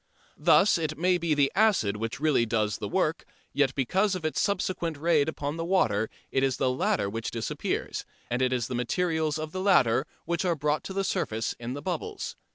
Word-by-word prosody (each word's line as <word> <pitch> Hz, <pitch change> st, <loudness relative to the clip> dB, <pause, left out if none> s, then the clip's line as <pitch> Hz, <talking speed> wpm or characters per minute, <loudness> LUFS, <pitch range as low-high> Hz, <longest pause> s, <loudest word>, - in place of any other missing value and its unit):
Thus 195 Hz, -3 st, +5 dB
it 155 Hz, -1 st, -2 dB
may 180 Hz, +2 st, +2 dB
be 165 Hz, -2 st, +1 dB
the 140 Hz, -1 st, +3 dB
acid 195 Hz, -, +3 dB
which 115 Hz, +5 st, -4 dB
really 150 Hz, -5 st, +3 dB
does 110 Hz, -2 st, 0 dB
the -, -, -3 dB
work, -, -, 0 dB, 0.3 s
yet 135 Hz, -2 st, +2 dB
because 190 Hz, -, +1 dB
of 175 Hz, -3 st, -5 dB
its 155 Hz, -, 0 dB
subsequent 180 Hz, -5 st, -1 dB
raid 160 Hz, -1 st, +2 dB
upon 145 Hz, 0 st, -4 dB
the 165 Hz, -, -2 dB
water 115 Hz, -, +1 dB, 0.2 s
it 135 Hz, -, +1 dB
is 135 Hz, -1 st, +1 dB
the 130 Hz, -, +1 dB
latter 125 Hz, -5 st, 0 dB
which 115 Hz, +3 st, -3 dB
disappears, 115 Hz, -1 st, -3 dB, 0.2 s
and 125 Hz, +2 st, -1 dB
it 130 Hz, 0 st, +2 dB
is 120 Hz, -3 st, 0 dB
the 130 Hz, -, -5 dB
materials 160 Hz, +5 st, 0 dB
of 155 Hz, 0 st, -5 dB
the 185 Hz, -, -4 dB
latter 175 Hz, -, +3 dB, 0.2 s
which 170 Hz, +2 st, -1 dB
are 175 Hz, -2 st, +1 dB
bought 150 Hz, +1 st, 0 dB
to 190 Hz, -, -5 dB
the 195 Hz, 0 st, 0 dB
surface 110 Hz, -, -1 dB
in 120 Hz, +1 st, -4 dB
the 145 Hz, -, -7 dB
bubbles. 415 Hz, -, -4 dB
150 Hz, 205 wpm, -27 LUFS, 125-175 Hz, 0.3 s, Thus